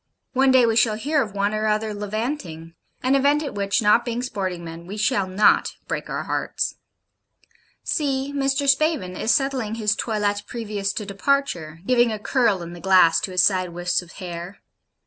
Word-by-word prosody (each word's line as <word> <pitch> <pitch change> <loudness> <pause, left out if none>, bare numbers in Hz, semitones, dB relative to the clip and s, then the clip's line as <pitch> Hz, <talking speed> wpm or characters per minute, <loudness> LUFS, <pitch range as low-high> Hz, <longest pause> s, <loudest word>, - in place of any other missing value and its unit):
One 265 0 +3
day 260 -2 +6
we 225 -1 +1
shall 225 -1 +3
hear 285 +7 0
of 210 -6 -4
one 200 +1 0
or 215 0 -1
other 215 0 0
levanting; 205 - -4 0.3
an 260 +1 +2
event 285 +2 +3
at 285 - -5
which, 200 +3 0
not 210 +3 +5
being 240 0 -3
sporting 185 -8 -4
men, 165 +1 -9
we 205 +3 -6
shall 205 -2 +1
not 190 +3 +3
break - - -4
our - - -3
hearts. - - -2 1.1
See 275 -3 -1
Mr. 275 0 0
Spavin 275 - +2
is 220 - -3
settling 255 -3 0
his 215 -2 +1
toilette 205 -3 -1
previous 210 -4 -3
to 210 - -4
departure; 195 - -1
giving 240 -1 +3
a 215 - -2
curl 210 -4 +1
in 170 0 -8
the 175 - -10
glass 185 -3 +5
to - - -4
his 180 0 +3
side 185 -3 +1
wisps 175 +1 0
of 175 -1 -15
hair. 175 0 -8
215 Hz, 185 wpm, -23 LUFS, 185-255 Hz, 1.1 s, day